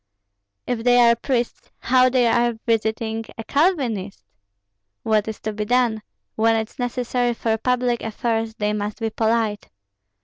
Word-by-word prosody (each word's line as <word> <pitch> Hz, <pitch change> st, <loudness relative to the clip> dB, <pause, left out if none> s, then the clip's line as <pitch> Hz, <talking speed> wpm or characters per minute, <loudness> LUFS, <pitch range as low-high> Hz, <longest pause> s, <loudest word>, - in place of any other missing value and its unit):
"If 235 Hz, -2 st, -2 dB
they 245 Hz, 0 st, +4 dB
are 235 Hz, -1 st, +6 dB
priests, 240 Hz, 0 st, -2 dB
how 255 Hz, +1 st, +3 dB
are -, -, +4 dB
they 240 Hz, -2 st, +2 dB
visiting 225 Hz, 0 st, -1 dB
a 225 Hz, -, -5 dB
Calvinist?" 250 Hz, -, 0 dB, 0.8 s
"What 215 Hz, -1 st, +1 dB
is 220 Hz, -, -5 dB
to 215 Hz, -, -3 dB
be 210 Hz, 0 st, -3 dB
done? 240 Hz, -2 st, +1 dB, 0.3 s
When 225 Hz, +1 st, +3 dB
it's 220 Hz, +2 st, -4 dB
necessary 245 Hz, 0 st, -1 dB
for 225 Hz, -1 st, 0 dB
public 250 Hz, 0 st, 0 dB
affairs, 225 Hz, 0 st, -2 dB
they 210 Hz, -2 st, -1 dB
must 210 Hz, +1 st, -4 dB
be 225 Hz, -1 st, -2 dB
polite." 220 Hz, -1 st, 0 dB
230 Hz, 145 wpm, -22 LUFS, 220-245 Hz, 0.8 s, are